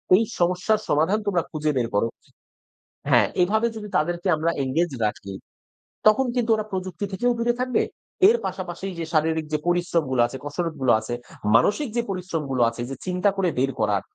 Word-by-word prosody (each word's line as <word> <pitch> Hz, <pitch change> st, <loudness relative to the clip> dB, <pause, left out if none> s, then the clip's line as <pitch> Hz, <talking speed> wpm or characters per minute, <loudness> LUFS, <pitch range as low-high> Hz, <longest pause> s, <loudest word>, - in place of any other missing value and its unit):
"এই 225 Hz, -, +4 dB, 0.2 s
সমস্যার 180 Hz, +5 st, +2 dB
সমাধান 160 Hz, +8 st, +2 dB
তোমরা 180 Hz, -4 st, +1 dB
খুঁজে 155 Hz, -1 st, 0 dB
বের 120 Hz, -2 st, +1 dB
করো" 115 Hz, -, +3 dB, 1.0 s
হ্যাঁ, -, -, +5 dB
এভাবে 220 Hz, +6 st, +2 dB
যদি 210 Hz, -1 st, -6 dB
তাদেরকে 175 Hz, +4 st, -1 dB
আমরা 160 Hz, +2 st, 0 dB
এনগেজ 160 Hz, +6 st, 0 dB
রাখি, 100 Hz, -2 st, -4 dB, 0.7 s
তখন 265 Hz, +5 st, +5 dB
কিন্তু 240 Hz, -2 st, 0 dB
ওরা 215 Hz, -1 st, -3 dB
প্রযুক্তি 185 Hz, 0 st, -3 dB
থেকেও 245 Hz, +6 st, +1 dB
দূরে 240 Hz, +1 st, +2 dB
থাকবে। 255 Hz, -1 st, +1 dB, 0.5 s
এর 475 Hz, -, +4 dB
পাশাপাশি 195 Hz, -, -5 dB
যে 165 Hz, -, -2 dB
শারীরিক 160 Hz, 0 st, +1 dB
যে -, -, +3 dB
পরিশ্রমগুলো 170 Hz, -8 st, +1 dB
আছে, 135 Hz, +2 st, -7 dB
কসরতগুলো 145 Hz, -4 st, -1 dB
আছে, 110 Hz, +2 st, -5 dB, 0.4 s
মানসিক 210 Hz, -, +3 dB
যে 235 Hz, -, +3 dB
পরিশ্রমগুলো 165 Hz, -9 st, -2 dB
আছে 115 Hz, +1 st, -8 dB
যে, 135 Hz, -, -4 dB
চিন্তা 185 Hz, +2 st, +1 dB
করে 185 Hz, -2 st, +2 dB
বের 135 Hz, +1 st, +2 dB
করার, 105 Hz, -3 st, +1 dB
175 Hz, 165 wpm, -24 LUFS, 145-205 Hz, 1.0 s, হ্যাঁ